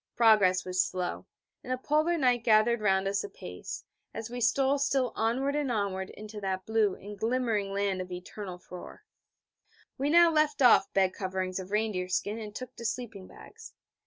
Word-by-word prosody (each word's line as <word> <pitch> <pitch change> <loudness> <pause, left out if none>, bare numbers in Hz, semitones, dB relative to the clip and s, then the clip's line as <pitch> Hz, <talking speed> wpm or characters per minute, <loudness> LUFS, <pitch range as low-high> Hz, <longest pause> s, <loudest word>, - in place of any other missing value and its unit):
Progress 210 -6 +4
was 185 0 +2
slow, 180 -1 -4 0.4
and 255 - -6
the 255 - 0
Polar 310 +6 +1
night 250 -5 +2
gathered 225 +1 +4
round 195 -2 +2
us 200 +1 0
apace, 415 +4 -8 0.3
as 225 +1 -6
we 245 0 -5
stole 270 +3 +2
still 270 -3 +1
onward 260 +6 0
and 290 -3 0
onward 195 -4 -2
into 210 0 -9
that 190 -1 -3
blue 220 -3 +2
and 205 +1 -10
glimmering 225 -3 0
land 195 -1 -1
of 185 0 -8
eternal 180 +1 -7
frore. 180 - -11 1.0
We 280 +2 0
now 340 +1 +6
left 305 -1 +2
off 240 -6 +5
bed 190 -1 +2
coverings 185 -1 -3
of 185 0 -7
reindeer 210 -3 -1
skin 205 +4 -1
and 210 -1 -8
took 255 -1 -7
to - - -8
sleeping 215 -4 -4
bags. 455 +1 -13
215 Hz, 175 wpm, -29 LUFS, 190-255 Hz, 1.0 s, now